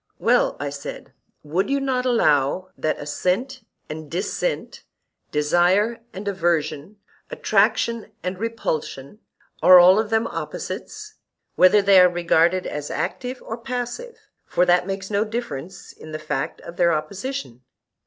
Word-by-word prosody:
Well, - - +2
I 145 0 -3
said, 140 0 -8 0.3
would 170 - -1
you 280 0 +1
not 260 -2 -1
allow 185 - +2
that 155 - -1
assent 205 - -2 0.2
and 155 0 -7
dissent, 195 - -3 0.5
desire 175 +9 +2
and 195 +2 -8
aversion, 170 -1 -1 0.3
attraction 220 +2 +1
and 180 0 -4
repulsion, 200 -7 -4 0.4
are 185 - +9
all 180 +3 +7
of 220 -1 -1
them 225 0 +1
opposites, 430 - -6 0.4
whether 195 +3 +5
they 195 -1 +6
are 180 - +6
regarded 175 +1 +2
as 150 0 -5
active 250 0 -4
or 225 +1 -6
passive 250 - -5 0.3
(for 180 - +2
that 180 +1 +3
makes 195 +1 -5
no 205 +1 +2
difference 195 - -6
in 155 - -12
the - - -2
fact 155 -3 -4
of 170 - -11
their 170 -1 +4
opposition)? 185 - -4
185 Hz, 135 wpm, -22 LUFS, 160-230 Hz, 0.5 s, are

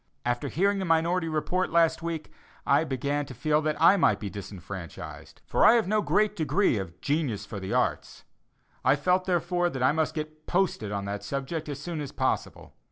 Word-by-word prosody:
After 120 +3 -1
hearing 195 +7 +1
the 190 - -2
minority 165 +1 +2
report 175 +4 0
last 165 -1 +3
week, 165 -2 -4 0.3
I 145 +3 +4
began 140 0 -2
to 130 - -9
feel 150 +5 +1
that 155 -1 -1
I 175 +5 +6
might - - +3
be 100 -3 -5
disfranchised, 95 -2 -9
for - - +1
I - - +8
have 230 -5 +2
no 215 +1 +2
great 210 0 +2
degree 165 - +2
of 90 -2 -7
"genius 140 -9 -1
for 105 -2 -6
the 95 0 -4
arts;" - - -1 0.6
I 130 +2 +5
felt, 180 +6 +1
therefore, 175 0 +1
that 130 -5 -3
I 130 - +5
must 155 0 -1
get 155 0 -6
"posted" 175 - 0
on 100 -1 -3
that 100 0 -4
subject 140 +7 -4
as 140 -2 -5
soon 165 +1 -4
as 145 - -6
possible. - - -2
155 Hz, 195 wpm, -27 LUFS, 125-175 Hz, 0.6 s, I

